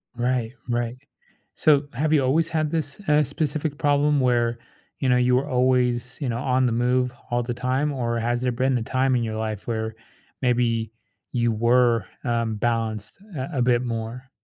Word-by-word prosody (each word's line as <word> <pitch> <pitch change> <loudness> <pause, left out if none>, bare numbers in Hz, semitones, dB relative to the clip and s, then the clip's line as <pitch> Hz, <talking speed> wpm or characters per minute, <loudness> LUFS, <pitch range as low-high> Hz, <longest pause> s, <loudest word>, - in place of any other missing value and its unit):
Right, 120 -1 -1 0.2
right. 120 +1 -1 0.6
So 145 -2 +4
have 155 +5 0
you 140 -3 +4
always 160 +6 +2
had 155 -2 0
this, 155 0 -2
uh, 150 0 +5
specific 145 +1 -2
problem 145 0 +2
where 120 -2 +2 0.4
you 130 - +1
know, 125 - +4
you 125 0 +3
were 135 +3 +1
always, 125 -2 +1
you 135 - -1
know, 115 0 -1
on 130 0 +2
the 120 - +1
move 125 +1 +1 0.2
all 120 0 0
the 120 0 -3
time 130 +4 0
or 115 -3 -1
has 120 +1 0
there 125 -1 +1
been 130 +2 +1
a - - -3
time 130 +1 +1
in 120 - +1
your 110 -1 -3
life 110 -1 -4
where 110 -1 -2 0.5
maybe 115 -3 +1 0.4
you 120 -1 +2
were, 120 0 +3 0.2
uh, 115 -1 0
balanced 110 - -2 0.2
a 130 +2 -3
a - - +2
bit 120 0 +3
more? 115 +2 -5
125 Hz, 185 wpm, -24 LUFS, 115-135 Hz, 0.6 s, uh